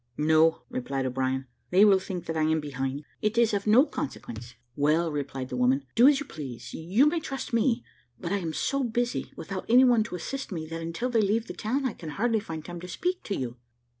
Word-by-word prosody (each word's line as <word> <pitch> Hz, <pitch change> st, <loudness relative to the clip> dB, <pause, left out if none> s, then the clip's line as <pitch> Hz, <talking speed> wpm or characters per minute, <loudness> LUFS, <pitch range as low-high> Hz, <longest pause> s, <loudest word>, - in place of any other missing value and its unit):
"No," 160 Hz, -2 st, +4 dB
replied 135 Hz, +2 st, -3 dB
O'Brien; 130 Hz, +1 st, -1 dB, 0.2 s
"they 190 Hz, +4 st, +6 dB
will 195 Hz, -2 st, +6 dB
think 180 Hz, -2 st, -5 dB
that 165 Hz, -, -3 dB
I 160 Hz, -, +1 dB
am 160 Hz, +1 st, +2 dB
behind. 140 Hz, -1 st, -3 dB, 0.2 s
It 215 Hz, +1 st, 0 dB
is 235 Hz, -2 st, +4 dB
of 200 Hz, +1 st, -1 dB
no 240 Hz, +7 st, +7 dB
consequence." 120 Hz, -, -6 dB, 0.2 s
"Well," 155 Hz, +3 st, +2 dB
replied 135 Hz, -3 st, -4 dB
the -, -, -4 dB
woman, 130 Hz, +2 st, +2 dB
"do 240 Hz, +3 st, +7 dB
as 285 Hz, -2 st, +5 dB
you 290 Hz, -, -5 dB
please, 135 Hz, -, -8 dB
you 185 Hz, -, +2 dB
may 320 Hz, +3 st, +2 dB
trust 270 Hz, -5 st, -5 dB
me; 230 Hz, +1 st, +2 dB, 0.4 s
but 170 Hz, -, -4 dB
I 200 Hz, -, +2 dB
am 165 Hz, -4 st, -3 dB
so 275 Hz, -, 0 dB
busy, 240 Hz, 0 st, -1 dB
without 190 Hz, -1 st, -5 dB
anyone 245 Hz, -1 st, +6 dB
to 180 Hz, -, -6 dB
assist 270 Hz, +9 st, -5 dB
me, 160 Hz, -4 st, -4 dB
that 165 Hz, 0 st, -5 dB
until 170 Hz, +10 st, -3 dB
they 230 Hz, -2 st, +3 dB
leave 215 Hz, +3 st, +1 dB
the -, -, -7 dB
town, 265 Hz, +6 st, -1 dB
I 250 Hz, -, 0 dB
can 160 Hz, -, -8 dB
hardly 225 Hz, +7 st, +1 dB
find 160 Hz, -6 st, -7 dB
time 175 Hz, 0 st, -7 dB
to 180 Hz, -, -8 dB
speak 360 Hz, -, -2 dB
to 200 Hz, -, -2 dB
you." 125 Hz, -2 st, -4 dB
175 Hz, 225 wpm, -27 LUFS, 145-235 Hz, 0.4 s, no